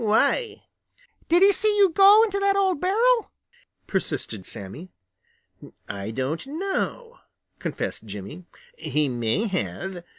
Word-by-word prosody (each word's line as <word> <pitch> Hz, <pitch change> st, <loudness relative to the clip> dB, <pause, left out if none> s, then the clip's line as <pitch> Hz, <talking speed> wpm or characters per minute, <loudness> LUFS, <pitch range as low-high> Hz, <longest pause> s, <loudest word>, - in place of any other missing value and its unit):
Why?" 225 Hz, -, +1 dB, 0.7 s
"Did 345 Hz, +3 st, +5 dB
he 400 Hz, -, +7 dB
see 420 Hz, +1 st, +1 dB
you 395 Hz, -3 st, +5 dB
go 400 Hz, +5 st, +7 dB
into 400 Hz, -3 st, -1 dB
that 395 Hz, 0 st, +2 dB
old 380 Hz, -6 st, +1 dB
barrel?" 455 Hz, +5 st, +2 dB, 0.5 s
persisted 140 Hz, -, -3 dB
Sammy. 100 Hz, -, -9 dB, 1.0 s
"I 100 Hz, +1 st, -5 dB
don't 135 Hz, -, -3 dB
know," 395 Hz, -, -4 dB, 0.4 s
confessed 110 Hz, -, -4 dB
Jimmy. 105 Hz, -, -8 dB, 0.3 s
"He 150 Hz, -1 st, -1 dB
may 120 Hz, -, -1 dB
have. 190 Hz, -2 st, -4 dB
225 Hz, 120 wpm, -24 LUFS, -, 1.0 s, he